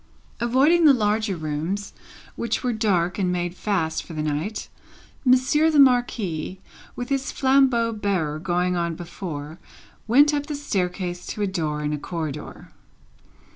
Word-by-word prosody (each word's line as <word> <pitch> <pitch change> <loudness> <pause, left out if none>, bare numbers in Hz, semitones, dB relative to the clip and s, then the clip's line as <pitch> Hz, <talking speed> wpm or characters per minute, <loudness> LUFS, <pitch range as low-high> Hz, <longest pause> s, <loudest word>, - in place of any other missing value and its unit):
Avoiding 275 +8 +4
the 285 -3 +8
larger 210 -2 0
rooms, 160 +6 -3 0.4
which 235 -1 -2
were 250 -1 0
dark 195 -5 0
and 185 -2 +1
made 175 -1 -2
fast 180 -5 -1
for 170 - -11
the 155 -1 -3
night, 155 +8 -3 0.6
Monsieur 260 +5 +4
the 310 - +1
Marquis, 225 - +2 0.4
with 245 0 -5
his 275 0 -1
flambeau 260 -4 +3
bearer 185 -8 -1
going 180 +1 0
on 170 -1 -1
before, 160 -3 -7 0.5
went 285 +6 +5
up 290 0 -1
the 300 - -3
staircase 180 -8 -3
to 210 - -3
a - - +3
door 155 -6 -2
in 150 0 -1
a 150 - -3
corridor. 155 -3 -6
195 Hz, 145 wpm, -24 LUFS, 170-245 Hz, 0.6 s, the